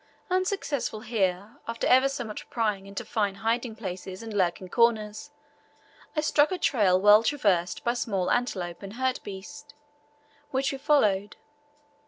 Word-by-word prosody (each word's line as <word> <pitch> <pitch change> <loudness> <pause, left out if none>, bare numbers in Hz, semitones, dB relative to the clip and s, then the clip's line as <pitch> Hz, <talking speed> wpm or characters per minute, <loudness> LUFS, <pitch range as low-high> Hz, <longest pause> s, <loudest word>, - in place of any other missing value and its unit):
Unsuccessful 370 - -1
here, 205 -2 -1
after 230 0 -3
ever 260 +2 +5
so 275 -2 -4
much 215 -2 -8
prying 210 -4 -1
into 200 0 -6
fine 205 -3 -1
hiding 225 +2 -1
places 190 -1 -6
and 225 -1 -7
lurking 185 -2 0
corners, 215 0 +1 0.9
I 305 - +2
struck 300 +1 +3
a 370 - -1
trail 200 - +3
well 210 +2 +7
traversed 200 -9 +1
by 235 - +1
small 195 -7 -1
antelope 185 -8 -1
and 195 0 -8
hartebeest, 260 +3 -5 0.7
which 270 0 0
we 275 - -5
followed. 215 -9 +2
220 Hz, 140 wpm, -27 LUFS, 195-260 Hz, 0.9 s, well